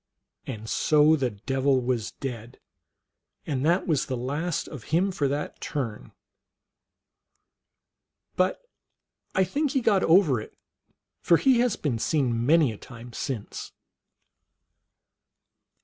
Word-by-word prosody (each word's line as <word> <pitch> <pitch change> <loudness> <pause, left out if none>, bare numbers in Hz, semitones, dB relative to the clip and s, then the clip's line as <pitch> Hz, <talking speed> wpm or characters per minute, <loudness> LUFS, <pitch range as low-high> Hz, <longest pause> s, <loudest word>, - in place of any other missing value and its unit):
And 110 -4 -6
so 150 +5 +4
the 135 -4 0
Devil 135 +5 0
was 120 -3 -2
dead, 120 -3 -7 0.9
and 135 -4 -2
that 170 +5 +2
was 155 -7 0
the 130 - -2
last 145 +8 -2
of 140 -8 -9
him 180 +5 +1
for 150 -7 0
that 145 +2 -4
turn; 125 -8 -4 2.2
but 185 - +1 0.7
I 190 - +4
think 280 - -1
he 270 - +3
got 205 -5 +3
over 160 - +4
it, - - -13 0.6
for 170 - +5
he 260 +3 +3
has 245 -3 +2
been 125 -7 -2
seen 120 -5 0
many 155 -4 +5
a 105 - -10
time 120 -1 -11
since. 115 -5 -5
140 Hz, 120 wpm, -26 LUFS, 120-170 Hz, 2.2 s, for